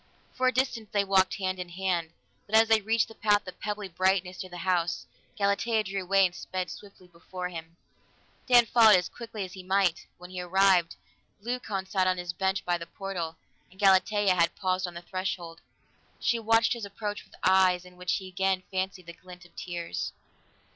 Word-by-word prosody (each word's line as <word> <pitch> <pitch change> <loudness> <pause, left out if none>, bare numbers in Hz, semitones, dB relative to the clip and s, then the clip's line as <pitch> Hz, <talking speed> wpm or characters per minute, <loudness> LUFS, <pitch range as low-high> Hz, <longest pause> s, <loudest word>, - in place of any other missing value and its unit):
For 255 0 +1
a - - +5
distance 235 -4 -1
they 205 -1 +2
walked 195 -1 +3
hand 185 -2 -2
in 180 -1 -5
hand, 175 -2 -1 0.4
but 215 - 0
as 225 0 +6
they 220 -1 +5
reached 225 +2 +1
the 225 - -12
path 205 -2 +2
of 185 - -9
pebbly 210 -1 -4
brightness 185 +1 0
near 185 - -7
the 175 - -9
house, 175 -1 0 0.3
Galatea 210 +2 +1
drew 195 -1 -3
away 195 +1 +4
and 180 - -1
sped 185 0 -4
swiftly 200 -2 -12
before 180 +1 -7
him. 165 -1 -9 0.7
Dan 245 -2 +7
followed 225 -2 +7
as 180 0 +1
quickly 225 -4 -6
as 180 - -11
he 190 - -8
might; 185 -2 +1
when 180 +1 -12
he 185 -1 -4
arrived, 180 -1 +3 0.5
Leucon 220 -5 -3
sat 190 -1 +1
on 185 0 +2
his 175 -1 -4
bench 190 +1 -1
by 175 -1 0
the 170 - -7
portal, 170 -4 -5 0.3
and 190 - -22
Galatea 195 0 +4
had 170 -2 +2
paused 185 -1 -1
on 175 - -9
the 170 - -8
threshold. 175 -2 -4 0.6
She 235 - +1
watched 225 +1 +3
his 235 -2 -7
approach 205 +1 -5
with - - -19
eyes 185 -1 +4
in 180 0 -15
which 180 0 -2
he 190 - -3
again 190 0 0
fancied 185 -1 -3
the 170 - -9
glint 180 0 -14
of 175 - -21
tears. 170 - -4
190 Hz, 195 wpm, -28 LUFS, 180-205 Hz, 0.7 s, Dan